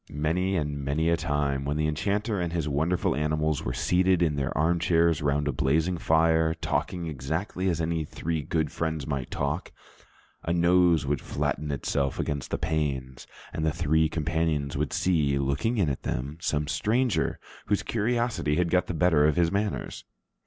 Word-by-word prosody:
Many 80 +6 0
and 75 -4 -2
many 75 +4 0
a 85 - +4
time, 75 -4 -1
when 70 +2 -2
the 75 - +1
enchanter 100 +7 -1
and 85 -1 -2
his 85 -3 -1
wonderful 80 +3 0
animals 75 0 0
were - - -2
seated 90 0 +2
in 75 -3 +1
their 70 -1 -2
armchairs 85 +1 +2
round 75 0 +1
a - - +2
blazing 80 +6 +1
fire, 80 0 +3
talking 85 +2 -2
exactly 80 +6 -2
as 85 -2 -1
any 80 -1 -1
three 80 +1 -3
good 80 0 -1
friends 80 -3 -2
might 70 -3 -3
talk, 70 +5 -2 0.7
a 85 - -3
nose 85 -2 +4
would 70 -1 -1
flatten 75 +1 -2
itself 70 0 -1
against 70 -3 -3
the - - -1
panes, 70 -5 -2 0.3
and 80 - -3
the 80 - +2
three 80 -1 +2
companions 80 -3 -1
would 70 -1 -1
see 75 -6 +1
looking 70 - 0
in 95 -6 +2
at 70 -2 -2
them 70 +6 -4
some 75 -1 -1
stranger 120 - 0 0.3
whose 105 - +1
curiosity 115 -8 0
had 85 0 +1
got 90 0 +2
the 90 - -3
better 80 -3 +4
of 75 - +2
his 85 -1 +2
manners. 100 +1 -2
80 Hz, 175 wpm, -27 LUFS, 75-85 Hz, 0.7 s, a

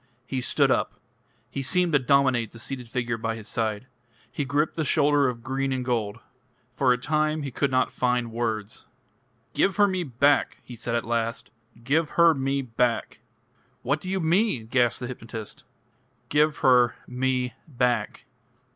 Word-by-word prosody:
He 130 0 -3
stood - - +2
up. - - 0 0.5
He 140 - -3
seemed 180 +4 +1
to 145 - +5
dominate 130 -4 +2
the 115 - -14
seated 125 0 -6
figure 120 -2 -2
by 115 0 -2
his 110 -1 -9
side. 110 0 -2 0.5
He 145 - -3
gripped 145 +3 0
the 160 - -1
shoulder 145 -1 +3
of 115 -2 -4
green 135 +1 -1
and 130 -1 -2
gold. 115 -4 -1 0.6
For 130 -1 +3
a 125 - +3
time 155 +3 0
he 140 - -4
could 140 +3 0
not 130 0 +1
find 125 -2 0
words. 110 -2 -3 0.7
"Give 195 - +2
her 205 0 +5
me 185 -2 -1
back!" 140 0 +2
he 125 - -10
said 115 0 -3
at 115 - -1
last. 115 0 -2 0.3
"Give 150 +5 +1
her 170 -1 +7
me 135 -1 -1
back!" 120 -1 -1 0.6
"What 145 +4 0
do 185 - -6
you 190 0 0
mean?" 170 - +1
gasped 120 +1 +1
the 125 - -3
hypnotist. 115 -3 -7 0.6
"Give 150 +1 +2
her 125 -2 +4
me 125 -1 -1
back." 125 -4 -1
130 Hz, 165 wpm, -25 LUFS, 120-145 Hz, 0.7 s, her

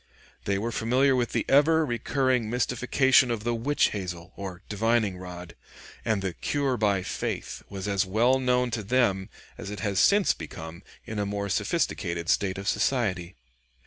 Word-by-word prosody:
They 100 0 +1
were 115 +4 -2
familiar 130 +4 +2
with 120 -2 0
the - - -1
ever 155 +3 +4
recurring 125 -1 0
mystification 125 +2 +3
of 115 -3 -2
the 120 +1 0
witch 135 +6 +1
hazel, 90 -4 -6
or 95 -1 -7
divining 110 -2 0
rod; 90 -1 -9 0.5
and 105 -3 0
the 95 -2 -2
"cure 140 +3 -1
by 100 -5 +1
faith" - - -4
was 100 0 -5
as 100 -1 +2
well 115 +7 +2
known 125 -1 +1
to 115 -1 -2
them 100 -4 +1 0.3
as - - -6
it 105 - -6
has 100 -3 0
since 200 -1 +4
become 80 +1 -9 0.2
in 110 -1 -5
a 100 - 0
more 100 0 -3
sophisticated 85 -2 -1
state 95 -2 +1
of 100 0 -6
society. 95 -11 0
110 Hz, 165 wpm, -27 LUFS, 95-125 Hz, 0.5 s, ever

